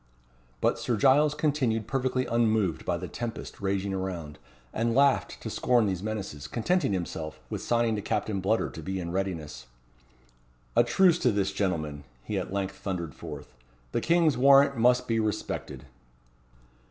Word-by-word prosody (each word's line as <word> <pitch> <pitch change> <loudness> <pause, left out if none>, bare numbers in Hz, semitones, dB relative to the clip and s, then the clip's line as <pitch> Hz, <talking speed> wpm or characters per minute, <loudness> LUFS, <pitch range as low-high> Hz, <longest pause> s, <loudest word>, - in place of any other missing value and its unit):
But - - +2
Sir 120 - -1
Giles 145 +5 +4
continued 135 -8 0
perfectly 130 +1 -1
unmoved 110 -7 +1
by 90 - 0
the 90 +1 -6
tempest 115 +2 -6
raging 100 0 -1
around, 90 -6 -4 0.3
and 115 +1 0
laughed 140 0 +3
to - - -4
scorn 120 -3 +2
these 95 -3 -1
menaces, 100 -9 -5
contenting 170 - 0
himself 80 -4 -4
with - - -3
signing 115 -2 +1
to - - -3
Captain 100 -1 -2
Bludder 110 +4 0
to 80 - -7
be 95 +4 -3
in 85 -1 -4
readiness. 85 -8 -4 1.1
"A - - +6
truce 175 +8 +4
to 125 - +3
this, 100 -1 0
gentlemen;" 80 -8 -2 0.2
he - - -2
at - - -5
length 100 -1 -3
thundered 85 -6 -4
forth; 65 0 -9 0.4
"the - - 0
King's 165 -6 +3
warrant 140 +1 +6
must 125 +1 +3
be 115 -1 +1
respected." 110 -8 -3
110 Hz, 155 wpm, -28 LUFS, 95-125 Hz, 1.1 s, A